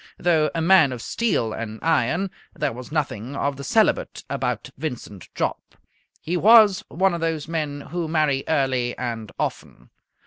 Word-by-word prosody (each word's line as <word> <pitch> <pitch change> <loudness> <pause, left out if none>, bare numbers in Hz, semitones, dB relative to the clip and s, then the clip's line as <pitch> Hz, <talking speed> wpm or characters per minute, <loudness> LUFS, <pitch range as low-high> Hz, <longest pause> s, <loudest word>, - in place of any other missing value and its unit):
Though 160 -3 +2
a 165 - 0
man 165 -6 +6
of 125 - -6
steel 115 - -1
and 110 -1 -5
iron, 165 +4 +1 0.2
there 150 -7 -1
was 125 +4 -9
nothing 140 -5 -3
of 140 0 -1
the 140 - -8
celibate - - +1
about - - -2
Vincent 125 - -6
Jopp. - - -3 0.4
He 175 - -3
was 210 0 +6
one 190 +2 +1
of 170 - -3
those 160 -2 -2
men 150 -3 -3
who 170 +3 -4
marry 155 -4 +1
early 130 -5 0
and 115 -3 -4
often. - - -5
150 Hz, 160 wpm, -23 LUFS, 125-165 Hz, 0.4 s, man